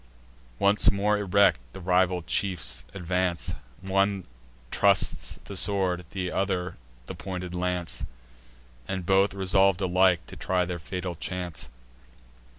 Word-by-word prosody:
Once 100 +5 +5
more 105 +1 +1
erect, 100 -5 +4
the - - -8
rival 90 -1 +2
chiefs 70 -12 -2
advance: 90 0 -1 0.3
One 95 0 +1 0.5
trusts - - +2
the 100 - -8
sword, 95 -2 +2
and 95 -2 -2
one 95 -2 -1 0.3
the - - -6
pointed 90 -2 -6
lance; 90 -1 -2 0.8
And 95 -2 -3
both 95 +2 +3
resolv'd 95 -1 +3
alike 90 -5 +3
to - - -11
try 90 -1 0
their 90 0 -4
fatal 90 +1 -4
chance. 90 -3 -4
90 Hz, 120 wpm, -27 LUFS, 90-95 Hz, 0.8 s, Once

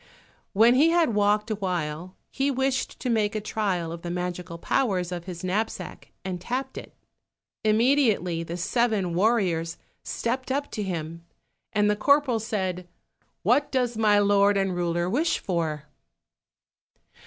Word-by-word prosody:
When 225 +4 +6
he 290 +6 +5
had 335 -8 +3
walked 210 +1 +2
a - - +1
while, 180 -2 -3 0.2
he 270 +1 0
wished 265 -1 -1
to - - -3
make 220 -2 +1
a - - 0
trial 195 -6 -2
of 170 0 -7
the 175 - -5
magical 180 -1 -4
powers 185 -2 0
of 175 -1 -5
his 180 -2 -7
knapsack 200 +5 -3
and 180 -2 -4
tapped 250 +8 -3
it. - - -9 0.7
Immediately 215 - +2
the 170 +1 -5
seven 205 -2 0
warriors 180 -5 +1 0.2
stepped 260 +3 -3
up 285 +2 -2
to 215 - -4
him, 170 -3 -4 0.5
and 210 -1 +2
the 210 - +2
corporal 275 +1 +3
said, 190 -5 -3 0.6
"What 255 +9 +2
does 250 -3 0
my 215 -2 +4
lord 205 0 +4
and 195 -2 0
ruler 175 0 0
wish 295 - +1
for?" 160 -5 -2
205 Hz, 145 wpm, -26 LUFS, 175-235 Hz, 0.7 s, When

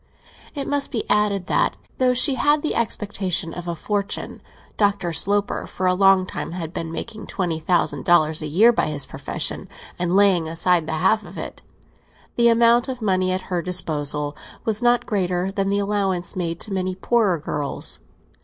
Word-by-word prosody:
It 280 -1 -3
must 285 -1 +1
be 225 - -2
added 205 -3 +2
that - - +1 0.2
though 255 -1 +3
she 270 +3 +4
had 290 +3 +2
the 310 - 0
expectation 200 -7 -1
of 175 0 -7
a 170 - -2
fortune—Dr. 200 -1 -3
Sloper 200 +5 0
for 185 - -4
a 185 - +4
long 195 0 +4
time 175 - -6
had 170 -2 -5
been 165 -2 -4
making 220 +5 -6
twenty 175 -5 -2
thousand 155 -4 0
dollars 160 -2 +3
a 155 - -3
year 210 +11 +5
by - - +1
his 150 -2 +1
profession, - - -3 0.3
and 180 +1 0
laying 195 -5 +4
aside 165 0 +1
the - - -2
half 215 +7 +2
of 180 0 -12
it—the 235 0 -5
amount 235 +1 +4
of 255 -2 -4
money 185 -2 +1
at 185 0 -1
her 175 - +1
disposal 150 -4 -1 0.3
was 220 0 0
not 240 0 +3
greater 185 -3 -1
than 195 0 -1
the 200 - +1
allowance 200 -3 -1
made 170 -2 -3
to 205 - -3
many 185 -1 -2
poorer 200 -2 +1
girls. 145 -2 -2
185 Hz, 175 wpm, -22 LUFS, 170-210 Hz, 0.3 s, year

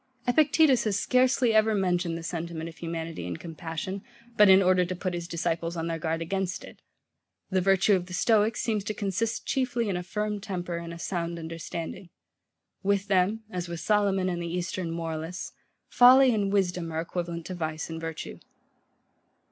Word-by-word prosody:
Epictetus 285 -1 +4
has 205 -2 +1
scarcely 255 -1 +3
ever 215 0 +4
mentioned 180 -3 0
the 165 - -8
sentiment 165 -1 -4
of 165 - -10
humanity 165 - -5
and 85 -2 -5
compassion, 165 +3 -5 0.3
but 210 -1 +7
in 190 0 +8
order 185 -1 +4
to 180 +1 -3
put 180 0 -3
his 170 -1 -4
disciples 170 0 -2
on 165 - -2
their 165 -1 -2
guard 165 +1 -1
against 190 +1 -2
it. - - -13 0.7
The 185 0 +2
virtue 195 +2 +4
of 180 -1 -2
the 180 - -5
Stoics 215 +1 +2
seems 215 -3 0
to 215 - -3
consist 215 +3 -2
chiefly 245 -4 0
in 190 - -1
a 180 - -2
firm 210 +3 -3
temper 180 -3 -4
and 170 0 -6
a 170 - -7
sound 170 -1 -3
understanding. 165 +2 -6 0.7
With 200 0 0
them, 200 +4 +2
as 180 -2 -3
with 170 -1 -5
Solomon 200 -2 +2
and 175 -1 -2
the 170 - -3
eastern 180 0 -3
moralists, 165 +1 -4 0.4
folly 255 +1 +7
and 200 -2 0
wisdom 180 -4 0
are 160 0 -1
equivalent 170 -1 -4
to 185 - -5
vice 160 -2 -3
and 165 0 -6
virtue. 165 -1 -6
180 Hz, 180 wpm, -27 LUFS, 170-205 Hz, 0.7 s, in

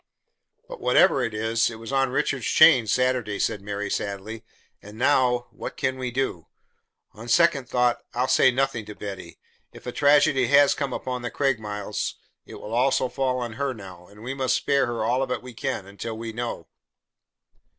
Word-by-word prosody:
"But - - -9
whatever 125 +2 +4
it 120 -3 -1
is, 115 +1 +1
it 115 - -8
was 115 +2 -9
on 135 -1 +2
Richard's 130 -1 -1
chain 135 -8 +6
Saturday," 125 -2 0
said 105 - -1
Mary, 100 0 -4
sadly. 100 +3 -4 0.4
"And 105 +1 -12
now, 125 -1 +2
what - - -8
can 130 0 -1
we 125 -1 -2
do? 120 -10 -3 0.7
On 115 +2 -11
second 140 -1 +3
thought 125 -1 +1
I'll 125 +2 +1
say 130 - +5
nothing 130 -2 -1
to 105 - -9
Betty. 100 -2 -8 0.3
If - - -14
a 125 - -4
tragedy 145 -2 +3
has 140 +1 +5
come 140 -3 -3
upon 125 0 -4
the 120 - -4
Craigmiles, 110 -7 -2 0.3
it - - -10
will 110 - -8
also 130 +1 +2
fall 130 -1 -1
on 120 -2 -4
her 140 -2 -1
now, 90 -4 -12
and 105 +2 -15
we 130 +3 -4
must 135 -2 0
spare 140 -2 +1
her 120 -2 -2
all 125 +3 +1
of 135 - -2
it 125 - -3
we 125 -1 -10
can, 120 -4 -3
until 100 +3 -7
we 115 0 -6
know." 115 -8 -5
125 Hz, 185 wpm, -24 LUFS, 110-130 Hz, 0.7 s, chain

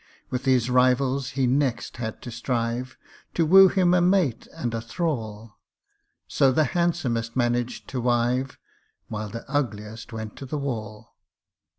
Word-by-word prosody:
With 130 +1 -3
his 130 -3 +3
rivals 130 +1 +2
he 135 - +3
next 130 -2 0
had 110 -2 -5
to 120 - -7
strive, 120 +1 -2 0.4
To 165 - +3
woo 190 +4 +8
him 180 -2 +3
a 180 - +4
mate 175 - +2
and 120 -2 -4
a 115 - -2
thrall; 115 - -4 0.7
So 135 - +3
the 155 +4 +3
handsomest 135 -10 0
managed 120 -1 -1
to 130 - -3
wive, 125 +2 0 0.5
While 105 -1 -4
the 115 +2 -8
ugliest 115 -6 -3
went 110 -2 -6
to 135 - -8
the 150 - -3
wall. 110 -6 -5
125 Hz, 150 wpm, -25 LUFS, 115-140 Hz, 0.7 s, woo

